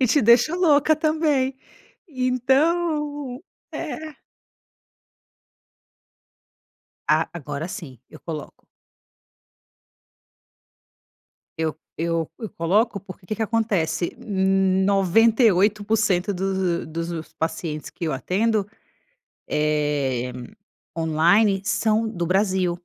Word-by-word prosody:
E 255 - +4
te 265 +3 +3
deixa 240 +8 +5
louca 315 -3 +4
também. 305 -4 +1 0.5
Então, 285 +2 0 0.3
é 310 -1 -6 2.9
A - - +2
agora, 150 0 -5
sim. 135 -10 -8
Eu - - -13
coloco. 155 -3 -8 2.9
Eu 160 -1 -1 0.2
eu 165 -1 -1
eu 220 -3 -5
coloco, 200 +5 +1
porque 185 -1 -12
que 215 - -3
que 225 - -5
acontece: 195 -8 0
98% 200 0 +2
dos 190 -3 -1
dos 165 0 -5
pacientes 160 -1 -4
que 170 - -6
eu 150 - -1
atendo, 205 +7 0 0.8
eh, 145 -5 0 0.7
online 175 +6 +3
são 220 +2 +1
do 175 -5 -3
Brasil. 190 -1 +1
195 Hz, 85 wpm, -23 LUFS, 165-235 Hz, 2.9 s, deixa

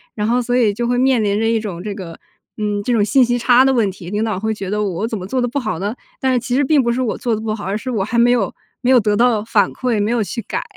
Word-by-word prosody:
然 210 -1 -1
后 245 +2 +2
所 245 +1 0
以 220 -5 +3
就 240 +3 -2
会 245 0 +1
面 255 -3 +3
临 205 0 +1
着 225 - +1
一 225 -1 +2
种 190 -6 -6
这 205 +2 -4
个 175 -4 -9 0.4
嗯， 205 -1 -2
这 245 - -1
种 220 -4 +3
信 255 +5 +4
息 245 0 +1
差 245 +1 +5
的 270 - +3
问 225 -5 +2
题， 180 -2 -10
领 210 +2 -1
导 215 -4 -2
会 220 +2 -1
觉 195 -3 -6
得 210 +1 -1
我 200 +2 -2
怎 225 - -3
么 185 - -6
做 255 +7 -2
得 245 - +1
不 245 - -4
好 215 -9 -3
呢？ 205 +4 -3 0.2
但 265 -1 +1
是 250 - +2
其 245 +1 -4
实 285 +2 +2
并 285 -1 +3
不 235 - +1
是 245 +2 -1
我 240 -4 -1
做 240 - -1
得 215 - -1
不 215 -1 -2
好， 205 - -8
而 195 +2 -2
是 255 +4 -6
我 215 -5 0
还 235 +4 -1
没 240 +1 +5
有 230 -6 +1 0.3
没 250 +1 +2
有 255 - +7
得 210 -1 +1
到 235 -1 +3
反 215 -2 +2
馈， 240 -5 -1
没 210 +3 0
有 240 - +1
去 200 +5 -5
改。 - - -4
225 Hz, 350 characters per minute, -18 LUFS, 205-245 Hz, 0.4 s, 有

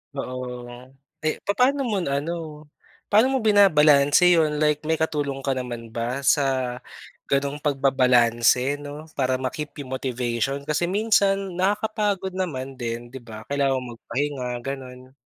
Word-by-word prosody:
Oo. 125 -2 -5 0.6
Eh, 155 - -1
papaano 255 +5 +2
mo 200 -5 -1
naano, 150 +1 -4 0.4
paano 225 +6 +4
mo 265 - +1
binabalanse 175 -5 +5
yon? 150 -2 +1
Like, 150 0 +1
may 160 +1 0
katulong 145 -4 -1
ka 135 -1 -1
naman 120 -2 -5
ba 120 +4 -3
sa 130 -3 +1 0.6
ganong 140 +1 0
pagbabalanse, 125 -2 +3
'no, 145 +2 -9
para 130 -2 0
ma-keep 150 +4 -4
yung 130 -2 -5
motivation 130 +2 -2
kasi 150 +3 0
minsan 195 -1 +1
nakakapagod 200 -1 -1
naman 135 -8 -4
din, 120 -1 -5
di 125 0 -10
ba? 110 -1 -10
Kailangan 140 -2 +1 0.2
magpahinga, 135 +2 -3
gano'n. 130 0 -8
140 Hz, 130 wpm, -24 LUFS, 130-170 Hz, 0.6 s, binabalanse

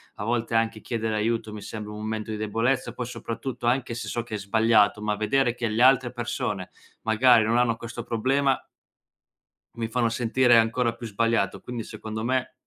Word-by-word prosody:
a 105 - -5
volte 115 0 -1
anche 115 -1 +1
chiedere 115 -2 -2
aiuto 110 0 -1
mi 105 - -7
sembra 105 0 -7
un 105 - -7
momento 110 0 -3
di 105 - -3
debolezza, 115 +5 0
poi 125 - -4
soprattutto, 120 +1 -5
anche 120 0 +1
se 120 - -5
so 120 - -2
che 110 -2 -6
è - - -2
sbagliato, 105 0 +3
ma 105 0 0
vedere 120 +4 +1
che 120 -2 -2
le 110 +3 +2
altre 130 -2 +5
persone, 105 -6 -3 0.3
magari 115 0 +5
non 115 +2 +2
hanno 120 -2 +2
questo 115 0 -7
problema 130 +4 +1 1.2
mi 115 -1 -3
fanno 115 0 +1
sentire 120 +1 +3
ancora 115 +1 +2
più 115 0 -8
sbagliato, 115 -2 0
quindi 120 -2 -5
secondo 110 +1 -6
me 130 0 0
115 Hz, 185 wpm, -26 LUFS, 110-120 Hz, 1.2 s, altre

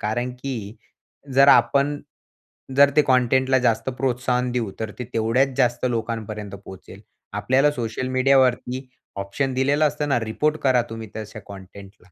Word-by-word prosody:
कारण 120 +4 -2
की 115 -5 -5 0.6
जर 140 +1 +6
आपण 140 +5 +4 0.8
जर 140 0 +7
ते 150 - +6
कंटेंटला 130 +1 +3
जास्त 115 -1 0
प्रोत्साहन 125 -1 0
देऊ, 115 -5 -2
तर 110 -1 -3
ते 125 - -4
तेवढ्याच 125 +4 +1
जास्त 120 -2 +1
लोकांपर्यंत 110 -3 -4
पोहोचेल. 95 - -12 0.3
आपल्याला 135 +3 +2
सोशल 120 0 -4
मीडियावरती 130 0 +1 0.3
ऑप्शन 100 +8 -2
दिलेलं 140 +4 +2
असतं 145 0 -4
ना, 140 - +2
रिपोर्ट 150 +8 -1
करा 130 -3 +3
तुम्ही 115 -1 -7
तशा 110 0 -7
कंटेंटला. 100 -1 -13
125 Hz, 140 wpm, -22 LUFS, 110-135 Hz, 0.8 s, जर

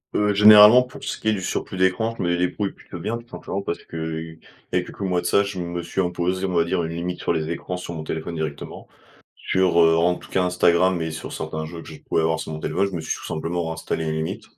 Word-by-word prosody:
Heu, 105 0 +2
généralement, 105 +3 +9
pour 125 - -9
ce - - -4
qui - - -5
est - - +3
du 95 - -3
surplus 95 +1 -3
d'écran, 95 +5 +1
je - - -3
me 85 0 +1
débrouille 90 +3 -1
plutôt - - -11
bien. 115 - -2
Tout 120 - -16
simplement 100 -5 -5
parce 85 - -4
qu'il 80 0 -5 0.3
y - - +1
a - - +2
quelques - - -11
mois 90 -2 0
de - - -12
ça, 100 - +4
je 100 -2 -5
me 85 0 -4
suis 95 +3 -1
imposé, 90 +1 -1
on 90 - -3
va 85 -1 +3
dire, 85 0 -1
une 80 0 -4
limite 90 +1 -4
sur - - -1
les 80 +1 -1
écrans, 90 +2 -4
sur 90 -1 -7
mon 80 -1 -5
téléphone 80 +2 -4
directement. 75 -3 -5 0.5
Sur, 95 -2 +2
heu, 80 0 +5
en 90 +2 +3
tout - - -13
cas, 95 -1 +1
Instagram 90 0 +3
et 80 - -2
sur 80 - -7
certains 80 0 -4
jeux 85 0 -8
que - - -13
je 80 - -10
pouvais - - 0
avoir 80 0 +1
sur 80 0 -5
mon 80 - -6
téléphone. 100 +2 0
Je 100 - -6
me - - -3
suis - - -3
tout - - -9
simplement 85 +1 -2
installé 80 0 -3
une 80 - -1
limite. 80 +1 -3
85 Hz, 270 wpm, -23 LUFS, 80-95 Hz, 0.5 s, généralement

